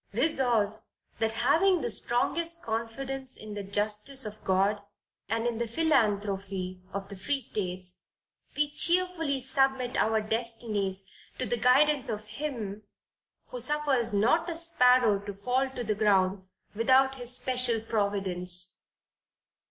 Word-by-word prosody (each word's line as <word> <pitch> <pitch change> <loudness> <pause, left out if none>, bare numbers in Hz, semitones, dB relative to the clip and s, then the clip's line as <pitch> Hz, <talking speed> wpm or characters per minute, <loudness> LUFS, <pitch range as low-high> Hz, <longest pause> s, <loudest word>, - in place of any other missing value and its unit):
Resolved, 235 -5 +1 0.4
That 225 -1 +1
having 355 +5 +4
the - - -1
strongest 335 +8 +1
confidence 260 +4 -4
in 215 -1 -9
the 205 - -4
justice 210 +6 -1
of 215 0 -8
God, 195 +2 +1 0.5
and 225 +2 -1
in 235 -1 -1
the 235 - -1
philanthropy 200 - 0
of 195 0 -5
the 200 - -7
free 275 +9 -2
states, 185 -6 -2 0.6
we 295 0 +1
cheerfully 335 -3 +2
submit 265 -1 +1
our 220 0 +2
destinies 215 -3 -2 0.3
to 255 - -2
the 240 - 0
guidance 270 +4 +3
of 215 -1 -4
Him 220 -6 -5 0.7
who - - -6
suffers 285 -6 +1
not 240 - +2
a 335 - -3
sparrow 250 -10 +4
to 200 0 -7
fall 250 +6 0
to 255 -2 -5
the 215 -2 0
ground 195 -2 +2 0.3
without 260 +4 +4
his 245 0 -3
special 250 -3 0
Providence." 190 -4 -2
230 Hz, 130 wpm, -28 LUFS, 205-270 Hz, 0.7 s, having